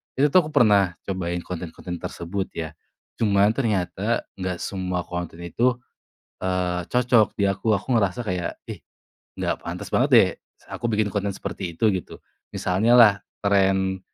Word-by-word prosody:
itu 145 Hz, +2 st, +3 dB
tuh 180 Hz, +1 st, +5 dB
aku 155 Hz, -, -9 dB
pernah 100 Hz, -9 st, +4 dB
cobain 90 Hz, -2 st, -2 dB
konten-konten 90 Hz, 0 st, -6 dB
tersebut 95 Hz, +4 st, -4 dB
ya, 80 Hz, -1 st, -4 dB, 0.5 s
cuman 100 Hz, -1 st, +3 dB
ternyata 105 Hz, -9 st, 0 dB, 0.2 s
gak 90 Hz, -2 st, -3 dB
semua 90 Hz, -2 st, -2 dB
konten 85 Hz, -1 st, -5 dB
itu, 120 Hz, +9 st, +1 dB, 0.7 s
eee, 90 Hz, -1 st, 0 dB
cocok 125 Hz, -3 st, +3 dB
di 100 Hz, -1 st, +2 dB
aku, 105 Hz, +3 st, 0 dB
aku 100 Hz, -, -2 dB
ngerasa 100 Hz, +2 st, 0 dB
kayak, 90 Hz, -1 st, -3 dB
"Ih, -, -, -7 dB, 0.6 s
nggak -, -, -2 dB
pantas -, -, -5 dB
banget -, -, +2 dB
deh -, -, +7 dB, 0.3 s
s -, -, -24 dB
aku 120 Hz, 0 st, -3 dB
bikin 105 Hz, -1 st, +1 dB
konten 100 Hz, 0 st, 0 dB
seperti 85 Hz, -4 st, -6 dB
itu," 115 Hz, -, +2 dB
gitu, 90 Hz, -, -6 dB, 0.3 s
misalnya 105 Hz, +6 st, +1 dB
lah 110 Hz, -4 st, +8 dB, 0.3 s
tren, 95 Hz, -1 st, +2 dB
95 Hz, 155 wpm, -24 LUFS, 90-110 Hz, 0.7 s, lah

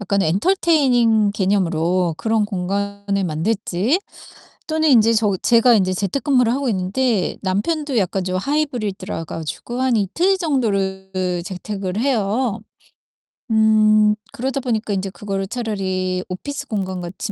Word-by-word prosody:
약간의 200 Hz, -3 st, 0 dB
entertaining 245 Hz, -, +3 dB
개념으로 180 Hz, -3 st, +1 dB
그런 220 Hz, +2 st, +1 dB
공간을 200 Hz, 0 st, -2 dB
만들지 190 Hz, -, 0 dB, 0.7 s
또는 315 Hz, 0 st, +1 dB
인제 230 Hz, -3 st, +5 dB
저 215 Hz, -3 st, +2 dB
제가 235 Hz, +1 st, +5 dB
인제 185 Hz, -3 st, +2 dB
재택근무를 250 Hz, -, +1 dB
하고 275 Hz, -1 st, -1 dB
있는데 200 Hz, +2 st, 0 dB
남편도 260 Hz, -, -1 dB
약간 190 Hz, -2 st, 0 dB
좀 185 Hz, 0 st, -2 dB
하이브리드라 215 Hz, -, -2 dB
가지고 165 Hz, +11 st, -5 dB
한 260 Hz, -2 st, +2 dB
이틀 335 Hz, -, +1 dB
정도를 200 Hz, -, -1 dB
그 180 Hz, -1 st, -1 dB
재택을 195 Hz, +1 st, -4 dB
해요. 230 Hz, -2 st, 0 dB, 0.9 s
음 215 Hz, -1 st, +4 dB, 0.2 s
그러다 265 Hz, +3 st, -2 dB
보니까 225 Hz, -4 st, -1 dB
인제 195 Hz, 0 st, -2 dB
그거를 195 Hz, -1 st, -4 dB
'차라리 190 Hz, -5 st, -2 dB
오피스 280 Hz, +10 st, -5 dB
공간 190 Hz, -5 st, -3 dB
같이 180 Hz, +4 st, -5 dB
210 Hz, 330 characters per minute, -20 LUFS, 190-245 Hz, 0.9 s, 인제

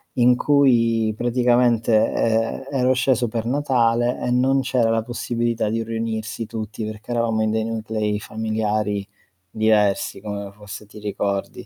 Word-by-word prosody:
in 125 Hz, 0 st, +5 dB
cui 115 Hz, -6 st, +3 dB
praticamente, 120 Hz, -1 st, +2 dB, 0.2 s
ehm, 115 Hz, +2 st, 0 dB
ero 130 Hz, -2 st, +2 dB
sceso 125 Hz, -1 st, +1 dB
per 115 Hz, 0 st, -3 dB
Natale 120 Hz, -3 st, +1 dB
e -, -, -1 dB
non 130 Hz, +2 st, +3 dB
c'era 125 Hz, -3 st, +1 dB
la 115 Hz, 0 st, +1 dB
possibilità 120 Hz, -1 st, -2 dB
di 115 Hz, +1 st, -1 dB
riunirsi 115 Hz, -1 st, -4 dB
tutti 110 Hz, 0 st, -6 dB
perché 110 Hz, +2 st, -8 dB
eravamo 115 Hz, -2 st, 0 dB
in 110 Hz, -, 0 dB
dei 110 Hz, 0 st, 0 dB
nuclei 110 Hz, -2 st, -2 dB
familiari 110 Hz, -2 st, -2 dB, 0.4 s
diversi 105 Hz, -1 st, +1 dB
come 100 Hz, -1 st, -5 dB
fosse 105 Hz, +1 st, -10 dB
ti 105 Hz, +1 st, -13 dB
ricordi. 100 Hz, -1 st, -3 dB
115 Hz, 140 wpm, -22 LUFS, 110-120 Hz, 0.4 s, in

